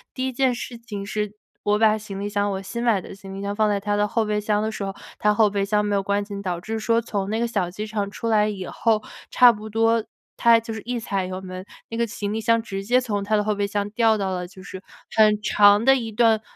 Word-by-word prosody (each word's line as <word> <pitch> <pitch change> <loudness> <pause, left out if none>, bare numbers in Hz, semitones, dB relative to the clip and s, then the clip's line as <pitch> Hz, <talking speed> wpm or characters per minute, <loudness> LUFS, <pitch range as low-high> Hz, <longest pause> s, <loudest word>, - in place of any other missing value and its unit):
第 260 0 -2
1 260 - -4
件 255 -1 +2
事 240 0 -6
情 210 -4 -7
是 210 0 -3 0.3
我 210 0 +2
把 215 -1 +5
行 200 -2 -7
李 205 - -2
箱 205 0 0
我 190 0 -3
新 235 +5 -5
买 225 -5 +3
的 - - -10
行 195 -1 -10
李 195 - -6
箱 200 0 -3
放 215 0 +2
在 200 -1 +1
他 205 +1 -1
的 205 0 +2
后 225 0 0
备 210 0 0
箱 210 0 0
的 220 - -1
时 205 - -5
候， 195 - -4 0.3
他 210 0 +3
后 210 -1 +4
备 200 -1 -1
箱 210 +1 +1
没 205 - -1
有 195 - +2
关 200 +1 0
紧， 200 -1 -7
导 180 -3 -3
致 220 +3 -4
说 230 +1 +2
从 200 -3 -3
那 220 - -1
个 235 - +1
小 200 -6 -1
机 210 +4 -5
场 205 -2 -2
出 230 - -5
来 210 -1 +3
以 195 -3 -4
后， 220 -2 +1 0.3
差 245 -1 +7
不 215 0 -8
多 225 +1 +2 0.3
他 230 -1 +6
就 225 0 -6
是 220 - -6
一 245 0 -2
踩 195 -4 -2
油 185 +1 -5
门， 185 0 -7 0.3
那 230 - -5
个 235 0 +1
行 205 -1 -4
李 220 - -1
箱 230 +1 +3
直 195 -3 -5
接 250 +3 +3
从 205 -5 -2
他 215 +1 +1
的 210 - +2
后 215 - 0
备 200 0 -1
箱 205 0 -2
掉 225 -1 +3
到 195 -2 -2
了 180 -1 -3
就 190 +1 -14
是 190 -1 -8 0.3
很 215 -1 +5
长 205 +1 +5
的 270 0 +7
一 230 -3 -4
段 225 -1 +3
210 Hz, 295 characters per minute, -23 LUFS, 200-225 Hz, 0.3 s, 差